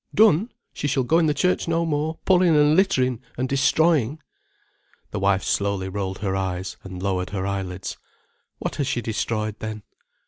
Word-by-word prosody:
"Done? 215 +1 +4 0.2
She 145 - -3
shall 135 -1 +1
go 160 +7 +3
in 165 - +3
the 150 - +2
church 180 0 +1
no 165 0 +1
more, 155 +1 -1
pulling 180 -3 +4
and 150 +1 +5
littering 130 - +2 0.2
and 130 +1 0
destroying." 145 +1 +2 0.9
The - - -3
wife 95 0 +2
slowly 100 -1 0
rolled 95 -1 -3
her 95 -1 0
eyes 95 -1 -3
and 95 -1 -8
lowered 95 -2 -1
her 95 -1 -3
eyelids. 95 -2 -4 0.6
"What - - -4
has 140 - 0
she 120 - -1
destroyed, 110 -1 -2
then?" 110 -1 -5
120 Hz, 170 wpm, -23 LUFS, 95-155 Hz, 0.9 s, and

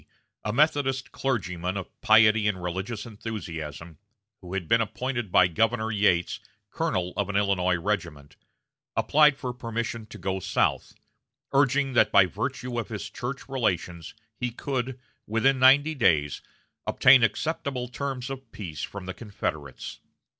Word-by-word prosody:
a 105 - -1
Methodist 135 0 +1
clergyman 95 -8 -2
of 95 - -8
piety 110 -1 +5
and 95 -4 -1
religious 95 +5 -4
enthusiasm, 85 -8 -7 0.4
who 90 0 -7
had 90 -4 -3
been 115 +5 +4
appointed 120 -1 -3
by 90 - +6
Governor 110 +5 +1
Yates 100 -5 +2 0.3
colonel 90 -1 -1
of 100 0 -1
an 100 - -3
Illinois 95 -3 +2
regiment, 85 -6 -3 0.6
applied 150 -1 +4
for 125 -3 -4
permission 115 -2 -4
to - - -10
go 95 +1 -2
South, - - 0 0.6
urging 140 0 +2
that - - +4
by 100 -2 +7
virtue 120 +7 -3
of 115 - -5
his 105 -3 -6
church 125 +2 -5
relations 90 - -2 0.2
he 125 - -2
could, 130 +1 -3 0.3
within 130 +5 +2
ninety 140 +4 +6
days, 80 - +2 0.5
obtain 130 0 +6
acceptable 135 +2 -1
terms 135 0 -4
of 135 -3 -8
peace 80 -8 -7
from 100 -2 -6
the 95 - -5
Confederates. 80 - -5
110 Hz, 140 wpm, -26 LUFS, 90-130 Hz, 0.6 s, by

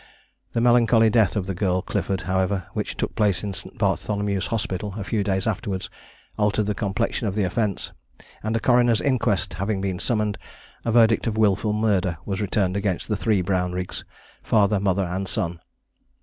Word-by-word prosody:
The 115 - +1
melancholy 115 -2 +5
death 110 -5 +3
of 100 -3 -1
the 95 - -3
girl 90 0 0
Clifford, 95 -2 -2
however, 95 0 0
which - - -3
took - - -2
place 105 -3 +1
in 100 -1 -3
St. 95 - -10
Bartholomew's 100 -2 0
Hospital 105 -3 -3
a 105 - -3
few 105 +1 -1
days 95 -1 0
afterwards, 105 -3 -2 0.5
altered 105 0 +2
the 105 - 0
complexion 105 +3 -1
of 100 - -2
the 105 - +1
offence; 100 +1 -1 0.5
and 110 +1 -2
a - - 0
Coroner's 120 -2 +4
Inquest 110 -9 0
having 100 +3 -1
been 95 -2 -2
summoned, 105 -2 0 0.4
a 115 - 0
verdict 115 -1 +4
of 110 -1 -1
wilful 105 0 +2
murder 100 -5 +1
was 100 0 -2
returned 100 -2 0
against 100 -1 -2
the 105 - +1
three 100 -2 +1
Brownriggs, 90 -1 -2 0.4
father, 105 -2 +3
mother, 100 0 +1
and 95 +2 -3
son. 85 -1 -2
100 Hz, 175 wpm, -24 LUFS, 95-110 Hz, 0.5 s, melancholy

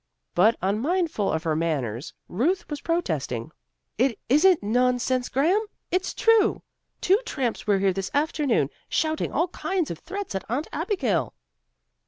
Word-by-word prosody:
But 215 +6 +5
unmindful 240 - 0
of 160 0 -1
her 160 -2 0
manners, 140 -7 -2 0.2
Ruth 310 - 0
was 290 - -4
protesting. 155 - -2 0.5
"It 250 -2 +2
isn't 310 - +5
nonsense, 250 +3 +1
Graham. 345 - +2 0.3
It's 370 +1 -1
true. 455 -2 +3 0.4
Two 385 +4 +4
tramps 250 - -3
were 205 -1 +4
here 195 -1 +2
this 195 0 -3
afternoon, 285 - +1 0.2
shouting 315 0 0
all 335 +4 +1
kinds 365 -2 -2
of 170 - -6
threats 395 - -6
at 190 - -3
Aunt 265 +7 -1
Abigail." 285 - -1
255 Hz, 140 wpm, -25 LUFS, -, 0.5 s, But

